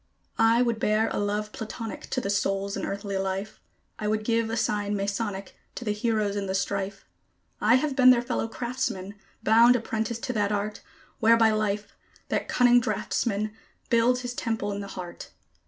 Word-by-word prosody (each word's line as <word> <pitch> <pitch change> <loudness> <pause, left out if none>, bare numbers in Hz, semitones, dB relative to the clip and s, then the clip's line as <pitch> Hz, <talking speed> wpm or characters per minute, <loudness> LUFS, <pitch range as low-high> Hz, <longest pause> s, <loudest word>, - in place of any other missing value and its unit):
I 225 +2 +5
would 235 -2 0
bear 215 +1 +2
a - - -2
love 210 +1 -1
Platonic 220 -1 -6
to - - 0
the 200 -5 -2
souls 195 0 0
in - - -3
earthly 200 0 -3
life; 195 +2 -3 0.4
I 210 - -2
would 215 0 0
give 230 -1 +1
a 225 - -2
sign 205 -1 0
Masonic 200 0 -3 0.2
to 245 - -6
the 210 - +1
heroes 210 -2 0
in 200 -1 -2
the 190 - -1
strife; 195 0 -2 0.5
I 225 +3 +5
have 275 +1 +1
been 255 -1 +7
their 245 -1 +5
fellow 240 -2 -1
craftsman, 225 -5 -3 0.3
bound 230 +3 +6
apprentice 225 -1 -2
to 250 +2 -4
that 205 -2 +1
Art, 210 +1 -2 0.4
Whereby 225 0 +5
Life, 210 -1 -1 0.3
that - - -1
cunning 245 0 +5
draughtsman, 215 0 -1 0.4
builds 240 +2 +3
his 245 0 -4
temple 225 -4 -2
in 200 - -3
the 200 - -6
heart. 180 -3 -8
215 Hz, 175 wpm, -27 LUFS, 200-230 Hz, 0.5 s, been